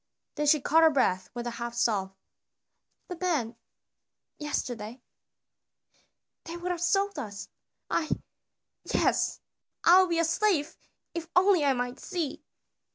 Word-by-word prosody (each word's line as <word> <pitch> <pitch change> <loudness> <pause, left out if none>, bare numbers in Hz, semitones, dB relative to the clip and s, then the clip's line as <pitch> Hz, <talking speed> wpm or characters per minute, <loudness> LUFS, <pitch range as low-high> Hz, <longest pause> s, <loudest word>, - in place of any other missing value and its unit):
Then 295 -1 -1
she 305 +1 +5
caught 315 +4 +3
her 320 - +7
breath 220 -11 +1
with 240 0 -4
a 240 - -2
half 235 0 -4
sob. 200 -5 0 0.9
"The 360 - -6
men 285 -11 0 0.8
yesterday 245 -6 -4 1.5
they 335 0 -6
would 355 +1 -3
have 345 -1 -3
sold 395 +2 +1
us. 200 -2 -7 0.4
I 310 - -1 0.7
yes, - - +1 0.4
I 360 +2 +8
would 370 - +1
be 335 - +1
a 335 - +3
slave 330 -3 +1 0.4
if 335 -1 -5
only 365 -3 +5
I 280 -1 +3
might 245 +1 -3
see!" 330 -6 -4
300 Hz, 135 wpm, -28 LUFS, 240-350 Hz, 1.5 s, I